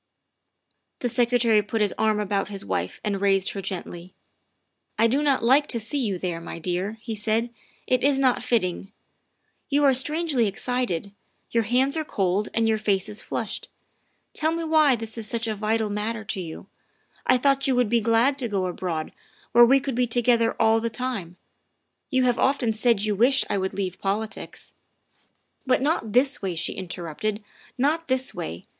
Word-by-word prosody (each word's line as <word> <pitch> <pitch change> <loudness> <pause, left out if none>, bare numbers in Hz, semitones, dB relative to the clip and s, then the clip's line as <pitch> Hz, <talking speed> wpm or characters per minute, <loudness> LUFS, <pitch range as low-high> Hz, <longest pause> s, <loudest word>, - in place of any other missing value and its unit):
' - - -54
' - - -52
The 245 - 0
Secretary 235 -2 +3
put 210 +2 -3
his 210 -2 +1
arm 215 -1 +1
about 200 -1 -1
his 200 -1 -6
wife - - -3
and 200 -2 -2
raised 195 -1 +2
her 195 - -5
gently. 180 -1 -6 0.4
" - - -50
I 225 - +4
do 260 +6 +2
not 280 -4 +2
like 270 +5 +4
to 235 - -2
see 230 +7 -2
you 210 -8 -1
there, 175 -2 -3
my 165 - -7
dear," 180 +5 -3
he 230 -1 -5
said, 220 +2 -1 0.3
"it 255 -1 +1
is 280 0 +3
not 260 -2 +2
fitting. 205 -6 -1 0.8
You 290 0 +2
are 275 -2 +6
strangely 290 -2 +1
excited; 200 -3 -2 0.4
your 230 -1 +1
hands 265 +4 +2
are 315 - -1
cold 195 -6 -1
and 230 -1 +2
your 220 -1 +1
face 200 -2 0
is 210 0 -2
flushed. - - -4 0.6
Tell 315 +1 0
me 330 0 -2
why 310 -4 +4
this 225 0 -5
is 220 - -1
such 230 0 -1
a 220 - -1
vital 215 +1 -1
matter 220 +2 -3
to 200 -3 -3
you. 165 0 -8 0.6
I 255 - +5
thought 275 +1 +2
you 265 - +2
would 245 -2 +3
be 235 0 +2
glad 235 +5 +2
to 245 - -2
go 195 -4 -1
abroad, 175 -3 -3 0.4
where 240 +1 +8
we 270 +3 +5
could 270 0 -4
be 245 +1 +1
together 235 -1 +2
all 225 0 +4
the 230 +1 -2
time. 220 -7 -4 0.7
You 260 -1 +2
have 245 -1 +2
often 260 -4 +2
said 220 -1 +2
you 215 -1 +1
wished 255 +6 +3
I 200 - +1
would 190 0 -3
leave 185 -3 -3
politics. 210 +3 -4 0.3
' - - -42
' - - -44
" - - -47
But 255 0 +2
not 280 -8 0
this 265 +3 +3
way," 190 -3 -2
she 165 - -2
interrupted. 185 +3 -4 0.2
" - - -24
Not 310 +5 +1
this 260 0 +1
way. 85 +2 -6
225 Hz, 200 wpm, -25 LUFS, 200-255 Hz, 0.8 s, where